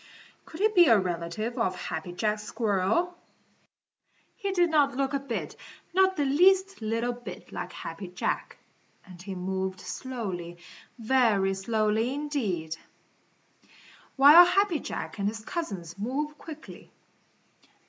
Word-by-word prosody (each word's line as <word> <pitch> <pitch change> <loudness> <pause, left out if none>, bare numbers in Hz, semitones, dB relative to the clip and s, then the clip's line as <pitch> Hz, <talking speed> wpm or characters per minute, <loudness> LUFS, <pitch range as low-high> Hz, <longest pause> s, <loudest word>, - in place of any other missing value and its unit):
Could 320 - -9
he 430 - +6
be 355 -6 +6
a 225 - +7
relative 185 +6 -3
of 190 -5 +1
Happy 160 +2 -5
Jack 210 +4 -1
Squirrel? 215 - 0 1.2
He 400 -4 -3
didn't 315 -7 +3
look 275 0 0
a 280 - +1
bit, 270 -4 -5 0.4
not 380 +1 +4
the 290 - +1
least 375 +5 +3
little 230 +2 -1
bit 230 -7 -10
like 180 - -5
Happy 180 +3 -7
Jack. 180 0 -3 0.5
And 180 -2 -13
he 190 0 -6
moved 190 +1 -3
slowly, 190 -10 -5 0.4
very 225 -5 +2
slowly, 215 +4 0
indeed, 210 - -2 1.4
while 290 +6 +10
Happy 360 -2 +2
Jack 220 - -6
and 200 - 0
his 220 +1 -4
cousins 195 - -5
move 285 +7 -2
quickly. 315 -1 -11
230 Hz, 125 wpm, -28 LUFS, 190-300 Hz, 1.4 s, while